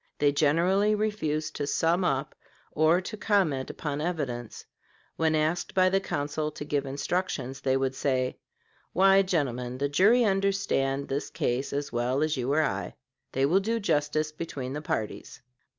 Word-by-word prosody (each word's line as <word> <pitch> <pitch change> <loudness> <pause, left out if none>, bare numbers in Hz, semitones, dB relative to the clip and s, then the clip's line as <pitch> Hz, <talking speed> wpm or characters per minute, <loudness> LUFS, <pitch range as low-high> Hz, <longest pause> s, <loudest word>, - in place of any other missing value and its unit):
They 145 -1 +3
generally 175 +8 +3
refused 155 -8 -2
to 145 - -2
sum 165 +5 +1
up, 140 -4 0 0.4
or 160 +4 +3
to 200 +4 -6
comment 185 -12 +1
upon 145 -1 -4
evidence; 140 -9 -4 0.5
when 160 -1 +1
asked 155 +3 -1
by 185 -1 +5
the 195 +1 +2
counsel 150 -3 -2
to 145 - -7
give 145 -2 -1
instructions 140 -2 -2
they 130 -1 +2
would 135 0 0
say, 130 -2 -1 0.5
"Why, 195 +2 +6
gentlemen, 130 -9 -1
the 140 +1 -1
jury 210 - +5
understand 195 -9 0
this 140 +2 -3
case 130 +3 -1
as 145 +1 -3
well 125 +4 +1
as 155 0 0
you 130 0 -1
or 155 +2 +3
I. 150 - -3 0.4
They 135 +1 +2
will 175 +7 +4
do 225 +4 -1
justice 155 -4 0
between 140 -5 -5
the 150 - -4
parties." 110 -8 -4
150 Hz, 160 wpm, -28 LUFS, 135-185 Hz, 0.5 s, Why